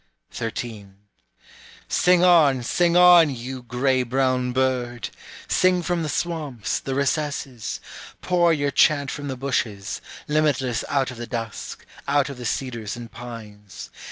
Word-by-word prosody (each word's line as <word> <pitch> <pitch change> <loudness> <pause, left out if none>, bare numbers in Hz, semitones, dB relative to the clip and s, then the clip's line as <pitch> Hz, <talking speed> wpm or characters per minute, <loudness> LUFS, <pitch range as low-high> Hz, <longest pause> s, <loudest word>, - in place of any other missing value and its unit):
13. 110 -3 -6 0.9
Sing 180 0 +3
on, 150 -8 +5
sing 175 +7 +2
on, 175 -3 +8
you 130 0 -6
gray 125 +2 +1
brown 125 0 0
bird! 125 -3 -1 0.4
Sing 185 -1 +3
from 175 0 -1
the 155 - -2
swamps, 150 -10 -2
the 135 - -4
recesses; 140 -4 -2 0.4
pour 175 -2 +2
your 145 -3 0
chant 140 0 +3
from 145 -1 -6
the 130 -2 -4
bushes, 110 -7 -2 0.3
Limitless 145 -5 +1
out 135 -2 +1
of 125 - -10
the 120 0 -6
dusk, 115 -3 -6 0.2
out 140 0 +2
of 135 - -9
the 125 - -7
cedars 120 -3 -3
and 120 -1 -9
pines. 105 -4 -10
130 Hz, 135 wpm, -23 LUFS, 120-150 Hz, 0.9 s, on